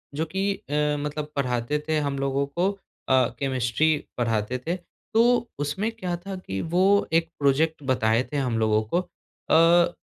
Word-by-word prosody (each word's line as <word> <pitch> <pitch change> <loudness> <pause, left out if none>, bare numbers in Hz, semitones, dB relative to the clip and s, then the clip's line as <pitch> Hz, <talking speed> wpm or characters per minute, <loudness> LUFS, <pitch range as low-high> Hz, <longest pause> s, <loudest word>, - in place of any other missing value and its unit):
जो 160 - 0
कि 195 +4 -1
अ, 145 - -10 0.3
मतलब 150 +1 -4
पढ़ाते 125 +1 0
थे 155 - +1
हम 140 -2 -2
लोगों 140 0 0
को 175 +7 0
अ, 130 -10 0
केमिस्ट्री 135 +3 +1 0.2
पढ़ाते 115 0 0
थे। 175 - +1 0.4
तो 235 +1 +3
उसमें 190 +10 -1
क्या 185 -6 -4
था 195 -1 -4
कि 95 - -5
वो 175 +3 +1 0.3
1 165 0 +2
प्रोज़ेक्ट 150 +2 +2
बताए 115 -1 +2
थे 145 - -2
हम 125 -4 0
लोगों 110 -1 +3
को 175 - +4
अ, 170 0 +2
150 Hz, 160 wpm, -25 LUFS, 130-175 Hz, 0.4 s, को